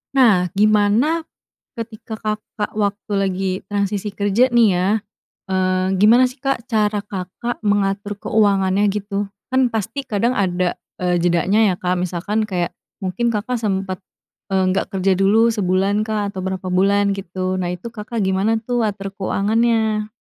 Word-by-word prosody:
Nah, 200 Hz, -9 st, +5 dB
gimana 215 Hz, +10 st, +3 dB, 0.5 s
ketika 225 Hz, -1 st, -7 dB
Kakak 215 Hz, -1 st, -4 dB
waktu 205 Hz, 0 st, -2 dB
lagi 190 Hz, -1 st, 0 dB
transisi 205 Hz, 0 st, -2 dB
kerja, 210 Hz, +6 st, +2 dB
nih, 235 Hz, -2 st, +6 dB
ya, 180 Hz, +1 st, +1 dB, 0.6 s
eee, 185 Hz, 0 st, +1 dB
gimana, 235 Hz, +5 st, +6 dB
sih, 255 Hz, -, -14 dB
Kak, 270 Hz, -2 st, -1 dB
cara 210 Hz, -2 st, +1 dB
Kakak 200 Hz, +4 st, -5 dB
mengatur 205 Hz, 0 st, +1 dB
keuangannya, 200 Hz, -2 st, +2 dB
gitu? 200 Hz, 0 st, -2 dB, 0.2 s
Kan, 260 Hz, -2 st, +2 dB
pasti 225 Hz, +6 st, -3 dB
kadang 230 Hz, +4 st, 0 dB
ada, 180 Hz, -2 st, 0 dB, 0.2 s
eee, 180 Hz, -1 st, +2 dB
jedanya, 180 Hz, +4 st, +3 dB
ya, -, -, -3 dB
Kak, 180 Hz, 0 st, 0 dB
misalkan 185 Hz, +5 st, -1 dB
kayak 180 Hz, -4 st, -1 dB, 0.3 s
mungkin 230 Hz, +5 st, -1 dB
Kakak 235 Hz, +4 st, -1 dB
sempat, 195 Hz, -4 st, -2 dB, 0.6 s
eee, 190 Hz, 0 st, +3 dB
nggak 195 Hz, +2 st, -1 dB
kerja 190 Hz, 0 st, +2 dB
dulu 215 Hz, +4 st, +4 dB
sebulankah 205 Hz, +1 st, 0 dB
atau 190 Hz, -, -7 dB
berapa 190 Hz, -1 st, -3 dB
bulan, 200 Hz, +2 st, +2 dB
gitu, 185 Hz, 0 st, -3 dB
nah, 180 Hz, -1 st, -2 dB
itu 180 Hz, +7 st, -7 dB
Kakak 225 Hz, 0 st, -5 dB
gimana, 195 Hz, +4 st, +1 dB
tuh, 240 Hz, -1 st, 0 dB
atur 195 Hz, -1 st, -3 dB
keuangannya? 215 Hz, +2 st, +1 dB
205 Hz, 140 wpm, -20 LUFS, 190-220 Hz, 0.6 s, nih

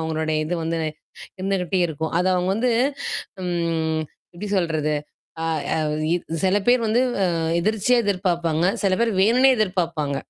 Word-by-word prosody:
அவங்களுடைய 160 Hz, -1 st, -1 dB
இது 175 Hz, -, -1 dB
வந்து 165 Hz, 0 st, -1 dB, 0.6 s
இருந்துகிட்டே 190 Hz, -1 st, 0 dB
இருக்கும். 160 Hz, 0 st, -4 dB
அத 180 Hz, -, +1 dB
அவங்க 180 Hz, +1 st, 0 dB
வந்து 245 Hz, +2 st, +1 dB, 0.7 s
ம். 165 Hz, -2 st, -1 dB, 0.3 s
எப்படி 200 Hz, +4 st, -6 dB
சொல்றது 155 Hz, -3 st, 0 dB, 0.5 s
அ -, -, -1 dB, 0.3 s
அ -, -, 0 dB, 0.7 s
சில 190 Hz, +1 st, +3 dB
பேர் 245 Hz, 0 st, +5 dB
வந்து 225 Hz, +3 st, +2 dB, 0.2 s
அ -, -, +4 dB, 0.4 s
எதிர்ச்சியா 215 Hz, +5 st, +2 dB
எதிர்பார்ப்பாங்க, 175 Hz, -4 st, 0 dB, 0.2 s
சில 195 Hz, -, +2 dB
பேர் 235 Hz, -, +2 dB
வேணுன்னே 250 Hz, +7 st, +5 dB
எதிர்பார்ப்பாங்க. 170 Hz, -8 st, -1 dB
180 Hz, 135 wpm, -23 LUFS, 160-205 Hz, 0.7 s, பேர்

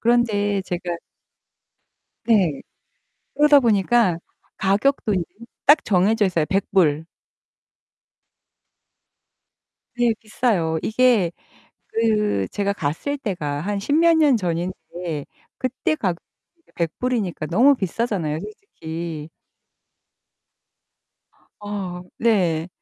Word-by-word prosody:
그런데 210 Hz, -4 st, +2 dB
제가 175 Hz, -1 st, -4 dB, 1.3 s
네. 185 Hz, -11 st, +3 dB, 0.7 s
그러다 295 Hz, 0 st, +6 dB
보니까 220 Hz, -4 st, +2 dB, 0.4 s
가격도 210 Hz, +3 st, +1 dB
인제 180 Hz, -, 0 dB, 0.4 s
딱 295 Hz, +2 st, +6 dB
정해져 210 Hz, +3 st, +2 dB
있어요. 170 Hz, -4 st, +1 dB
$100. 170 Hz, -6 st, +1 dB, 2.9 s
네. 240 Hz, -2 st, +2 dB
비싸요. 205 Hz, -8 st, 0 dB
이게 220 Hz, -7 st, +3 dB, 0.6 s
그 210 Hz, -, +1 dB
제가 200 Hz, 0 st, -1 dB
갔을 180 Hz, -, -3 dB
때가 160 Hz, -, -3 dB
한 200 Hz, +4 st, -2 dB
십몇 320 Hz, +9 st, +3 dB
년 290 Hz, -6 st, +4 dB
전인데 175 Hz, -3 st, -4 dB, 0.3 s
그때 260 Hz, +4 st, -1 dB
가격으로 185 Hz, -, -1 dB, 0.4 s
이게 335 Hz, -, -31 dB
$100이니까 180 Hz, -1 st, -2 dB
너무 245 Hz, -, +5 dB
비싸잖아요, 190 Hz, -, -2 dB
솔직히. 165 Hz, -, -7 dB, 2.3 s
어 195 Hz, -4 st, -5 dB, 0.2 s
네. 180 Hz, -8 st, +1 dB
200 Hz, 175 characters per minute, -22 LUFS, 170-235 Hz, 2.9 s, 그러다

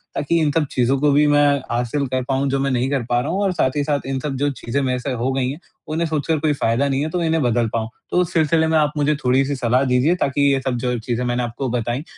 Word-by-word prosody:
ताकि 165 Hz, +4 st, +1 dB
इन 150 Hz, -, +2 dB
सब 155 Hz, +1 st, +1 dB
चीज़ों 125 Hz, +2 st, +1 dB
को 145 Hz, 0 st, +3 dB
भी 145 Hz, +2 st, +4 dB
मैं 145 Hz, 0 st, +4 dB, 0.3 s
हासिल 120 Hz, +4 st, -1 dB
कर 130 Hz, 0 st, -2 dB
पाऊँ, 135 Hz, +1 st, +1 dB
जो 135 Hz, -, 0 dB
मैं 135 Hz, 0 st, 0 dB
नहीं 125 Hz, +1 st, 0 dB
कर 135 Hz, -3 st, 0 dB
पा 120 Hz, 0 st, +2 dB
रहा 140 Hz, -, -4 dB
हूँ 195 Hz, -, -1 dB
और 195 Hz, -, +1 dB
साथ 130 Hz, -7 st, +1 dB
ही 145 Hz, -, +1 dB
साथ 145 Hz, -1 st, 0 dB
इन 135 Hz, -1 st, -2 dB
सब 140 Hz, 0 st, -4 dB
जो 145 Hz, +1 st, +1 dB
चीज़ें 135 Hz, +1 st, -3 dB
मेरे 125 Hz, -2 st, -1 dB
से 135 Hz, +1 st, -4 dB
हो 125 Hz, +2 st, -1 dB
गई 130 Hz, -1 st, 0 dB
हैं, 145 Hz, -, -6 dB, 0.3 s
उन्हें 165 Hz, +2 st, -1 dB
सोच 155 Hz, -3 st, -2 dB
कर 160 Hz, -2 st, +1 dB
कोई 155 Hz, 0 st, +1 dB
फ़ायदा 135 Hz, 0 st, 0 dB
नहीं 135 Hz, 0 st, 0 dB
है, 155 Hz, -, -2 dB
तो 175 Hz, +2 st, -2 dB
इन्हें 160 Hz, 0 st, +1 dB
बदल 120 Hz, -1 st, +1 dB
पाऊँ। 110 Hz, -1 st, -2 dB, 0.2 s
तो -, -, 0 dB
उस 175 Hz, -, -3 dB
सिलसिले 160 Hz, 0 st, +2 dB
में 160 Hz, 0 st, +2 dB
आप 150 Hz, -1 st, +2 dB
मुझे 150 Hz, +1 st, +2 dB
थोड़ी-सी 135 Hz, +3 st, +2 dB
सलाह 125 Hz, +1 st, +1 dB
दीजिए, 130 Hz, +6 st, +2 dB
ताकि 140 Hz, -3 st, +1 dB
ये 135 Hz, -, +1 dB
सब 125 Hz, -2 st, 0 dB
जो 125 Hz, -1 st, 0 dB
चीज़ें 120 Hz, +2 st, -3 dB
मैंने 120 Hz, 0 st, -1 dB
आपको 120 Hz, +3 st, -4 dB
बताईं, 120 Hz, +3 st, -2 dB
135 Hz, 285 wpm, -20 LUFS, 125-150 Hz, 0.3 s, भी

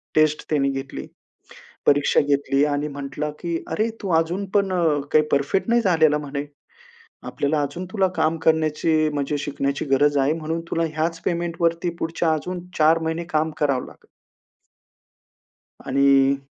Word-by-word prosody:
Taste 155 Hz, -1 st, +3 dB
त्यांनी 140 Hz, -3 st, +2 dB
घेतली, 135 Hz, -, -6 dB, 0.8 s
परीक्षा 145 Hz, 0 st, +4 dB
घेतली 140 Hz, -1 st, +1 dB
आणि 145 Hz, 0 st, -1 dB
म्हटला, 140 Hz, +1 st, -5 dB
की 170 Hz, -1 st, -2 dB
"अरे, 220 Hz, +2 st, 0 dB
तू 195 Hz, -, -4 dB
अजून 175 Hz, +5 st, -2 dB
पण 200 Hz, -2 st, +2 dB
अ, 165 Hz, -5 st, +2 dB
काही 155 Hz, 0 st, +4 dB
परफेक्ट 140 Hz, +9 st, +1 dB
नाही 235 Hz, 0 st, +4 dB
झालेला," 160 Hz, -6 st, +3 dB
म्हणे. 145 Hz, -1 st, -5 dB, 0.8 s
"आपल्याला 145 Hz, +1 st, -1 dB
अजून 145 Hz, +6 st, -5 dB
तुला 195 Hz, -3 st, +2 dB
काम 160 Hz, 0 st, +1 dB
करण्याची, 155 Hz, 0 st, +2 dB
म्हणजे 145 Hz, 0 st, -1 dB
शिकण्याची 140 Hz, -1 st, -2 dB
गरज 145 Hz, +2 st, +3 dB
आहे, 140 Hz, +2 st, +2 dB
म्हणून 165 Hz, +1 st, -3 dB
तुला 165 Hz, -, +1 dB
ह्याच 165 Hz, +1 st, -1 dB
पेमेंटवरती 170 Hz, 0 st, 0 dB
पुढच्या 165 Hz, 0 st, 0 dB
अजून 180 Hz, +3 st, -5 dB
4 160 Hz, +2 st, +5 dB
महिने 160 Hz, +1 st, -2 dB
काम 155 Hz, +1 st, +1 dB
करावं 140 Hz, -4 st, +1 dB
लागेल." -, -, -17 dB, 1.8 s
आणि. 140 Hz, 0 st, +4 dB
155 Hz, 140 wpm, -22 LUFS, 145-165 Hz, 1.8 s, 4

